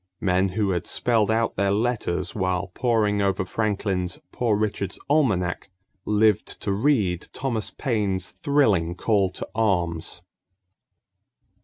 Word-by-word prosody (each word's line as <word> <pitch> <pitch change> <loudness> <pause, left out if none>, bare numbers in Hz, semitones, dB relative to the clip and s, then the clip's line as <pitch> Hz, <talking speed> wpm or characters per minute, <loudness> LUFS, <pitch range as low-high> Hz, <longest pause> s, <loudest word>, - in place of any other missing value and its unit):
Men 95 0 +2
who 100 -3 +2
had 90 -1 -2
spelled 115 -4 +1
out 115 +1 +1
their 100 +1 +2
letters 100 -5 -1
while 95 -1 -1
poring 110 -4 +1
over 95 -1 0
Franklin's 95 -3 -1
Poor 115 -4 +1
Richard's 100 -3 -2
Almanac 100 - +1 0.4
lived 105 -1 +2
to - - -1
read 100 - +1
Thomas 125 -5 -2
Paine's 100 -8 -1
thrilling 105 - +1
call 100 -1 +2
to 90 - -6
arms. 90 -5 -1
100 Hz, 120 wpm, -24 LUFS, 90-110 Hz, 0.4 s, Men